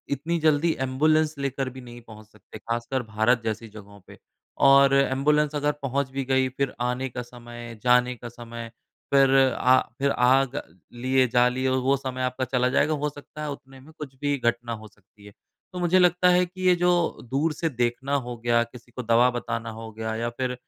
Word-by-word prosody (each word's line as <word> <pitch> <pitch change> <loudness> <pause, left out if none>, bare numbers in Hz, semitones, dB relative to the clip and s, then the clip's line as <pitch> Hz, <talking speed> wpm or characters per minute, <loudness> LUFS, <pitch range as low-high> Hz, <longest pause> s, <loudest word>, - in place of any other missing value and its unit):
इतनी 165 +5 -2
जल्दी 155 +2 +3
एम्बुलेंस़ 155 +4 +2
लेकर 135 -1 -2
भी 130 - -8
नहीं 120 0 -12
पहुँच 110 -1 -13
सकते 110 0 -14
ख़ासकर 120 +3 -3
भारत 110 +2 +1
जैसी 110 +1 -3
जगहों 100 -1 -12
पे। - - -14 0.5
और 135 0 +6
एम्बुलेंस़ 145 +2 +2
अगर 145 0 +1
पहुँच 135 0 -1
भी 135 0 -3
गई 130 0 +2
फ़िर 135 +1 -2
आने 130 +1 -2
का 125 - -5
समय 120 -1 -10
जाने 125 0 +3
का 120 0 -9
समय 115 -1 -9 0.4
फ़िर 135 -1 +5 0.2
आ 130 +1 +5 0.2
फ़िर 140 0 +1
आग 130 +2 +2 0.3
लिए 130 +2 +1
जा 120 +1 +3
लिए 130 +1 -1
वो 130 +1 +1
समय 130 -1 -5
आपका 125 +1 -2
चला 125 0 +1
जाएगा 155 +4 +2
हो 150 - +1
सकता 145 +1 -12
है 150 - -3
उतने 135 -1 -11
में 150 +4 -16
कुछ 140 -3 -8
भी 145 -1 0
घटना 120 -1 -1
हो 110 - -10
सकती 100 0 -23
है। 105 - -13 0.4
तो 180 - -5
मुझे 175 +1 +3
लगता 180 0 +4
है 180 0 +4
कि 185 +1 -12
ये 180 - +6
जो 180 - +5 0.4
दूर 155 +4 +1
से 165 +2 -2
देखना 125 +2 -1
हो 120 - -5
गया 120 0 +2
किसी 120 +1 -15
को 125 +1 -6
दवा 115 +2 +4
बताना 115 -1 -4
होगा 110 0 -8
हो 110 - -9
गया 110 0 -4
या 115 +1 -2
फ़िर 125 +1 -3
130 Hz, 205 wpm, -25 LUFS, 120-140 Hz, 0.5 s, और